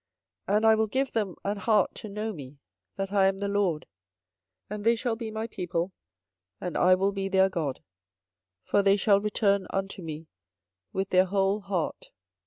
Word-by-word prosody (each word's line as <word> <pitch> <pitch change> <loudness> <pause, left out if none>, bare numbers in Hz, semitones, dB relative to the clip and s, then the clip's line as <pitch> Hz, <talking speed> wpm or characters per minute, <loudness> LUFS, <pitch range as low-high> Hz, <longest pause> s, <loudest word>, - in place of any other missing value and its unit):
24:024:007 205 - +2
And 220 - +1
I 220 - +7
will 220 0 +1
give 265 +5 -1
them 205 -5 -1
an 205 +1 -1
heart 205 -1 +2
to 215 - -8
know 215 +2 -3
me, 140 -4 -10 0.4
that 195 0 -3
I 195 -2 +4
am 195 0 0
the 200 +1 -2
LORD: 200 -6 0 0.8
and 210 0 -6
they 230 +2 +4
shall 235 0 -1
be 225 -1 -5
my 220 +1 -3
people, 180 -4 -3 0.7
and 180 - -4
I 185 +1 +5
will 195 +2 +1
be 195 -1 -3
their 190 0 +4
God: 155 -8 -3 0.8
for 205 - +2
they 200 0 +4
shall 200 0 +4
return 200 -2 +1
unto 195 0 -3
me 160 -1 -6 0.7
with 190 0 -2
their 185 0 +5
whole 195 +2 +1
heart. 195 -5 -3
195 Hz, 185 wpm, -28 LUFS, 185-210 Hz, 0.8 s, I